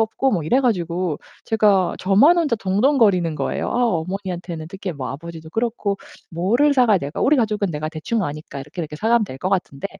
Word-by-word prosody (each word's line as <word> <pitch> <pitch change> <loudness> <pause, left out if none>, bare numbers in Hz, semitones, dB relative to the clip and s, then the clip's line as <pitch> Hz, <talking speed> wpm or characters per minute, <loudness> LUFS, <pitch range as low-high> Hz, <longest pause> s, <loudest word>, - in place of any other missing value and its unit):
없고 225 +4 +1
뭐 170 -5 0
이래 250 - +3
가지고 175 - -1 0.3
제가 205 -4 +2
저만 230 - +5
혼자 295 -9 +1
동동거리는 200 - +2
거예요. - - -2
'아 245 0 +1
어머니한테는 180 -3 -3
특히 190 0 -5
뭐 135 -3 -5
아버지도 160 +2 -9
그렇고 225 -2 -1 0.3
뭐를 225 - +2
사가야 245 -7 +4
될 140 -1 -5
우리 295 +3 +3
가족은 210 -6 0
내가 155 0 -4
대충 185 +8 -2
아니까 145 -1 -6
이렇게, 150 +6 -7
이렇게 150 -2 -5
사가면 225 +5 +2
될 130 - -8
것 185 - -2
같은데. 180 -4 -2
190 Hz, 425 characters per minute, -21 LUFS, 165-225 Hz, 0.3 s, 저만